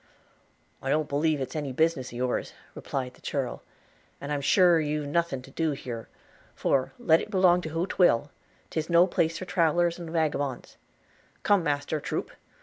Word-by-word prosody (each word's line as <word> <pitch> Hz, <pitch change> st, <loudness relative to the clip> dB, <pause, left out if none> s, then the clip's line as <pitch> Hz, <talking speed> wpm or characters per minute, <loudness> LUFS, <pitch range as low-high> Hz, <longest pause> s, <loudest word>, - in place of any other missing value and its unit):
'I 135 Hz, -, -4 dB
don't 155 Hz, +1 st, +1 dB
believe 150 Hz, +2 st, +1 dB
'tis 135 Hz, +3 st, -5 dB
any 145 Hz, -3 st, -3 dB
business 160 Hz, -1 st, +1 dB
of -, -, -10 dB
yours,' 125 Hz, +1 st, -2 dB, 0.2 s
replied 130 Hz, -2 st, -4 dB
the -, -, -21 dB
churl, 135 Hz, -4 st, -3 dB, 0.6 s
'and 140 Hz, +1 st, -6 dB
I'm 145 Hz, -1 st, -1 dB
sure 175 Hz, +3 st, +5 dB
you've 150 Hz, -1 st, -1 dB
nothing 145 Hz, -3 st, -1 dB
to 135 Hz, -, -14 dB
do 160 Hz, +1 st, 0 dB
here; 120 Hz, -4 st, -7 dB, 0.5 s
for, 135 Hz, -1 st, +1 dB
let 160 Hz, 0 st, +4 dB
it -, -, -7 dB
belong 185 Hz, -3 st, +4 dB
to 160 Hz, -, -5 dB
who 165 Hz, +3 st, -1 dB
'twill 145 Hz, -8 st, +2 dB, 0.2 s
– -, -, -35 dB
'tis 160 Hz, 0 st, -2 dB
no 170 Hz, +1 st, +6 dB
place 165 Hz, -2 st, 0 dB
for 185 Hz, -, -6 dB
travelers 175 Hz, -1 st, +1 dB
and 170 Hz, -2 st, -7 dB
wagabons 145 Hz, -5 st, -2 dB, 0.3 s
– -, -, -34 dB
Come, 205 Hz, -2 st, +4 dB
master, 145 Hz, -1 st, -1 dB
troop! -, -, -4 dB
155 Hz, 180 wpm, -27 LUFS, 140-170 Hz, 0.6 s, no